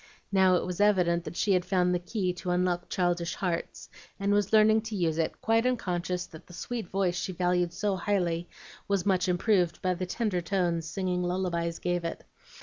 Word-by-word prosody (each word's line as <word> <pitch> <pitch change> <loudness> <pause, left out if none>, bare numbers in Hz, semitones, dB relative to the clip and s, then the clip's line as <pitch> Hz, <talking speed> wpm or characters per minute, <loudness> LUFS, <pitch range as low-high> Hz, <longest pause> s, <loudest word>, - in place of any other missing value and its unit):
Now 190 -2 +5
it - - 0
was 180 +1 -3
evident 180 -5 +3
that - - -7
she 200 - +2
had 180 -1 +2
found 180 -1 +1
the 180 - +1
key 180 +1 -2
to 180 +1 -6
unlock 180 0 0
childish 175 -2 0
hearts, 175 -3 -3 0.3
and 200 +1 +1
was 205 -1 +1
learning 220 0 +5
to 215 - -4
use 165 -4 0
it, 160 - -1
quite 225 +1 +3
unconscious 180 -7 -1
that 160 - -14
the 180 - -13
sweet 230 +3 -4
voice 185 -2 0
she 185 +1 -3
valued 180 -1 +1
so 205 +2 -1
highly 175 -3 -1 0.4
was 200 -2 0
much 185 -2 +2
improved 180 -1 +2
by 185 -1 +2
the 180 +1 -4
tender 205 -4 -1
tones 170 -2 0
singing 180 +1 -1
lullabies 175 -2 -1
gave 175 -1 -1
it. 165 - -4
180 Hz, 195 wpm, -28 LUFS, 175-195 Hz, 0.4 s, Now